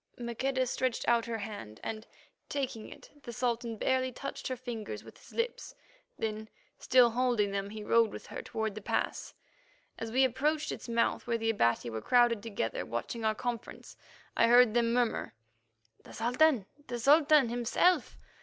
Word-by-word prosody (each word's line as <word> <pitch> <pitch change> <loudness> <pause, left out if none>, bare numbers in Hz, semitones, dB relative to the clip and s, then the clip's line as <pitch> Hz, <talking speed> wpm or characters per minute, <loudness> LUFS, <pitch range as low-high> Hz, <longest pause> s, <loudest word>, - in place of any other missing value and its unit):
Maqueda 255 +2 -1
stretched 255 0 -2
out 235 -1 +3
her 230 -1 -2
hand, 205 - -7
and, 220 0 -5 0.4
taking 260 -6 -3
it, - - -14
the 240 - -8
Sultan 235 -1 -2
barely 260 +2 +1
touched 275 +3 -6
her 255 - -2
fingers 240 -4 -6
with - - -14
his - - -17
lips. 465 +1 -3 0.4
Then, 220 0 -4 0.3
still 245 -1 +5
holding 235 -4 +1
them, 200 0 -3
he 215 0 -7
rode 230 +1 +4
with - - -9
her - - -7
toward 220 -1 -3
the 215 - -7
pass. - - -2 0.6
As 225 0 -5
we 260 +3 +4
approached 295 +5 0
its - - -7
mouth, 230 +1 0
where 235 -1 +1
the 225 0 +1
Abati 120 - +1
were 110 0 -4
crowded 240 - +3
together, 200 - -3
watching 170 - -4
our 220 0 +1
conference, 240 0 -5 0.4
I 230 - +4
heard 240 -1 +6
them 235 -1 +2
murmur, 240 - 0 0.7
"The - - -13
Sultan, 250 0 +2 0.2
the 240 - -3
Sultan 290 +1 +5
himself!" 245 +10 +1
235 Hz, 165 wpm, -31 LUFS, 220-255 Hz, 0.7 s, heard